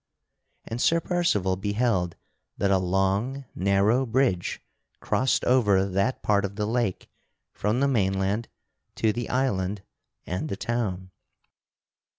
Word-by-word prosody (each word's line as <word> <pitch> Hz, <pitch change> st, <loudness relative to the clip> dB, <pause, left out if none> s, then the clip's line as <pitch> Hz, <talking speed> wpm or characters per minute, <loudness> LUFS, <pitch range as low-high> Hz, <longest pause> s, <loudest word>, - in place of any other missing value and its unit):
And 115 Hz, +2 st, -4 dB
Sir 165 Hz, -, +4 dB
Percival 165 Hz, -, +1 dB
beheld 100 Hz, -3 st, 0 dB, 0.4 s
that 100 Hz, -, +1 dB
a 95 Hz, -, +4 dB
long 95 Hz, +9 st, 0 dB
narrow 100 Hz, +6 st, +2 dB
bridge 115 Hz, -7 st, +1 dB, 0.4 s
crossed 130 Hz, 0 st, +1 dB
over 105 Hz, -7 st, +4 dB
that 100 Hz, +6 st, -1 dB
part 100 Hz, -1 st, +2 dB
of 100 Hz, 0 st, -4 dB
the 105 Hz, 0 st, -1 dB
lake 115 Hz, -3 st, -1 dB, 0.5 s
from 110 Hz, +5 st, 0 dB
the 140 Hz, -, +4 dB
mainland 100 Hz, -2 st, 0 dB, 0.5 s
to 110 Hz, -1 st, +1 dB
the 120 Hz, +1 st, -4 dB
island 100 Hz, -7 st, -1 dB, 0.4 s
and 90 Hz, +2 st, -3 dB
the 100 Hz, -, -3 dB
town. 100 Hz, -6 st, -3 dB
105 Hz, 125 wpm, -26 LUFS, 95-120 Hz, 0.5 s, Sir